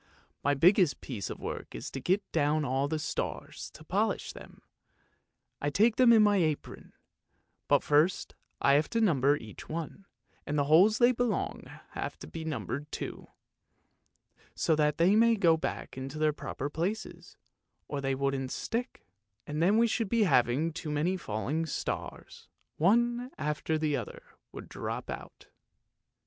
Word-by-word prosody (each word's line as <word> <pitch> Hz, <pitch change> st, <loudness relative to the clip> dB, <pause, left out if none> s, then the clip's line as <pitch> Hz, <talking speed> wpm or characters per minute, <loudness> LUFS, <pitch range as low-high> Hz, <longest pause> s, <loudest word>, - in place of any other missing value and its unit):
My 145 Hz, 0 st, +2 dB
biggest 180 Hz, +1 st, +4 dB
piece 110 Hz, -8 st, -5 dB
of -, -, -6 dB
work -, -, -6 dB
is -, -, -6 dB
to 135 Hz, -, -5 dB
get 190 Hz, +8 st, +1 dB
down 150 Hz, -1 st, +1 dB
all 135 Hz, +2 st, 0 dB
the 155 Hz, +2 st, -1 dB
stars 155 Hz, -, -4 dB
to -, -, -12 dB
polish -, -, -1 dB
them; -, -, -13 dB, 1.0 s
I 145 Hz, -, 0 dB
take 215 Hz, +9 st, +3 dB
them 250 Hz, -2 st, +6 dB
in 220 Hz, -2 st, +7 dB
my 205 Hz, -1 st, +4 dB
apron; 155 Hz, -5 st, -2 dB, 0.7 s
but -, -, +3 dB
first 150 Hz, +5 st, +2 dB, 0.3 s
I 140 Hz, -, +4 dB
have 150 Hz, +2 st, +3 dB
to 230 Hz, -, 0 dB
number 145 Hz, -, +3 dB
each 110 Hz, -5 st, -11 dB
one, 165 Hz, +5 st, -6 dB, 0.4 s
and 150 Hz, -, -3 dB
the 145 Hz, -, +3 dB
holes 180 Hz, +10 st, +5 dB
they 245 Hz, 0 st, +5 dB
belong 245 Hz, -1 st, -1 dB
to -, -, -13 dB
have -, -, -5 dB
to -, -, -10 dB
be 165 Hz, -, -7 dB
numbered 145 Hz, -, -4 dB
too, -, -, -6 dB, 1.3 s
so 160 Hz, -, +2 dB
that 150 Hz, -1 st, +1 dB
they 180 Hz, +5 st, +4 dB
may 230 Hz, +1 st, +5 dB
go 170 Hz, -6 st, +4 dB
back 160 Hz, -, -4 dB
into 135 Hz, +3 st, -6 dB
their 155 Hz, 0 st, +2 dB
proper 145 Hz, -1 st, -5 dB
places, 175 Hz, +9 st, -4 dB, 0.5 s
or 145 Hz, -1 st, -3 dB
they 135 Hz, -1 st, 0 dB
wouldn't 135 Hz, -1 st, -1 dB
stick, 240 Hz, +2 st, -4 dB, 0.4 s
and 150 Hz, +1 st, -3 dB
then 195 Hz, +6 st, +4 dB
we 230 Hz, -, +5 dB
should 225 Hz, -2 st, -1 dB
be 230 Hz, 0 st, +3 dB
having 140 Hz, -, +2 dB
too 160 Hz, -1 st, -6 dB
many 150 Hz, +5 st, 0 dB
falling 150 Hz, -, -2 dB
stars, -, -, -5 dB, 0.3 s
one 240 Hz, +7 st, +2 dB
after 150 Hz, +1 st, -1 dB
the 155 Hz, -2 st, 0 dB
other 120 Hz, -6 st, -6 dB, 0.3 s
would -, -, -9 dB
drop -, -, -5 dB
out." -, -, -9 dB
155 Hz, 160 wpm, -30 LUFS, 145-200 Hz, 1.3 s, in